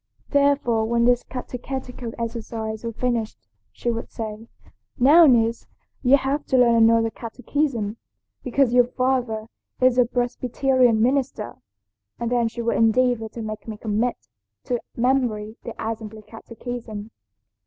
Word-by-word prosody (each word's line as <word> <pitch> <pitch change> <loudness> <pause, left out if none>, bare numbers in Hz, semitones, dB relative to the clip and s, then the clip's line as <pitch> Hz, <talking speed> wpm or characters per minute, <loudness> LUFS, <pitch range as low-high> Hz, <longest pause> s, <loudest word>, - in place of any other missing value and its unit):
Therefore 280 -6 +2
when 235 +1 +2
this 245 0 +4
catechetical 250 -1 -6
exercise 225 -1 -4
was 230 -1 -4
finished 235 -3 -1 0.3
she 240 - -2
would 230 0 -5
say, 220 0 -6 0.5
'Now, 305 +6 +7
niece, 230 -3 +2 0.3
you 265 +2 +6
have 280 +2 -1
to 265 - +2
learn 240 -2 +5
another 225 0 +4
catechism, 235 -2 -2 0.5
because 255 -1 +2
your 245 -1 +5
father 250 -4 -1 0.3
is 255 -1 +4
a 250 - +6
Presbyterian 245 -1 +1
minister,' 255 -3 -1 0.6
and 235 0 -2
then 240 -2 +2
she 235 +1 -5
would 230 - +1
endeavor 225 0 +2
to 230 +1 -7
make 215 +1 -6
me 220 -2 -5
commit 220 +3 -1 0.5
to 245 -3 -1 0.2
memory 235 -4 0
the 235 - -7
Assembly 220 -1 -5
catechism. 225 -1 -8
235 Hz, 130 wpm, -23 LUFS, 225-255 Hz, 0.6 s, Now